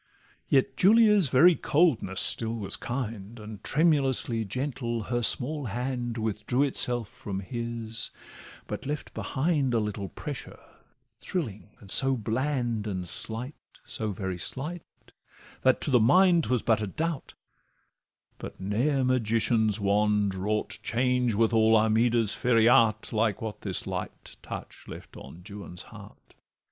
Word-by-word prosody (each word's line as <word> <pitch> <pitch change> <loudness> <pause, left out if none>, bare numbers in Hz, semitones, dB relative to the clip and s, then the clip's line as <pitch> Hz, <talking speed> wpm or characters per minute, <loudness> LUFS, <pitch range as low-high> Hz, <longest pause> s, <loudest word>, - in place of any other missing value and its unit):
Yet 135 -1 +2
Julia's 210 - +5
very 155 +8 +6
coldness 145 - +1
still 115 0 +2
was 105 -4 +2
kind, 115 -3 -5
And 105 -2 -10
tremulously 135 -7 +1
gentle 120 0 -3
her 120 +2 -2
small 140 +5 +2
hand 120 +1 -3
Withdrew 110 +4 -1
itself 120 -4 +1
from 100 -1 -6
his, 115 +1 -5 0.6
but - - -6
left 150 +1 -5
behind 140 -3 0
A - - +3
little 105 -2 -4
pressure, - - -7 0.6
thrilling, 110 - -5
and 100 -3 -5
so 135 +4 +5
bland 120 -1 -2
And 95 -3 -4
slight, 115 - -4 0.3
so 110 -1 -4
very 95 -2 -4
slight, 155 - -4 0.8
that 130 0 +3
to 145 - 0
the 125 - +5
mind 175 - +5
'Twas 125 -3 0
but 110 -2 +2
a 105 - -2
doubt; 160 - -4 1.0
but - - -9
ne'er 125 +9 0
magician's 115 -3 +1
wand 105 0 +1
Wrought 105 +3 -2
change 125 -1 0
with 115 +2 +2
all 110 0 +4
Armida's 110 0 +2
fairy 115 -2 +3
art 110 -3 +3
Like 110 -2 +1
what 110 -2 -6
this - - -3
light - - -6
touch - - -9
left - - -11
on 90 - -12
Juan's 100 -4 -8
heart. - - -14
115 Hz, 135 wpm, -27 LUFS, 105-130 Hz, 1.0 s, very